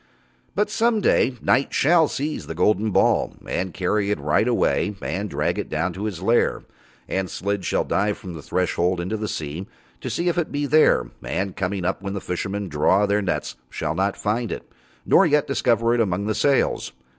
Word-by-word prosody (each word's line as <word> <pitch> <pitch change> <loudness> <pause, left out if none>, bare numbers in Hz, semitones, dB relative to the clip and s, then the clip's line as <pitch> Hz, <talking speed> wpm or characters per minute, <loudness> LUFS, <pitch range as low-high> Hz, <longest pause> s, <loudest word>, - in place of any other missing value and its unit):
But 210 0 +1
some 225 0 +2
day 135 -9 +2
Night 135 - +2
shall 160 +2 +4
seize 150 +3 -4
the - - -5
golden 110 +1 +2
ball - - +2
and 95 0 -2
carry 100 +3 0
it 105 - 0
right 110 - +1
away 110 -3 +1
and 100 +2 -3
drag - - -1
it - - -4
down 85 +3 -1
to 100 +4 -5
his 95 -5 -4
lair, 115 +4 +2 0.4
and 95 -1 -2
Slid 100 0 -2
shall - - +1
dive 105 +1 0
from 90 - -8
the 80 - -8
Threshold 90 +1 0
into 90 +5 -2
the 110 0 -3
sea 80 +2 -5 0.3
to - - -5
see 175 - -1
if 175 0 +1
it 165 - -2
be 145 0 -1
there, 145 - +4
and 95 -1 -2
coming 95 -1 -2
up 95 - -1
when 100 0 -4
the 100 - -3
fishermen 100 +3 -3
draw 95 +6 +3
their 105 +1 +1
nets 90 -8 -2
shall 75 - -3 0.2
find 110 +2 -2
it - - -5
not, - - -32 0.4
nor 195 - +5
yet 150 -2 +3
discover 120 -3 +2
it 120 - +2
among 100 -2 0
the 110 - 0
sails. 135 +6 +1
100 Hz, 200 wpm, -23 LUFS, 95-125 Hz, 0.4 s, nor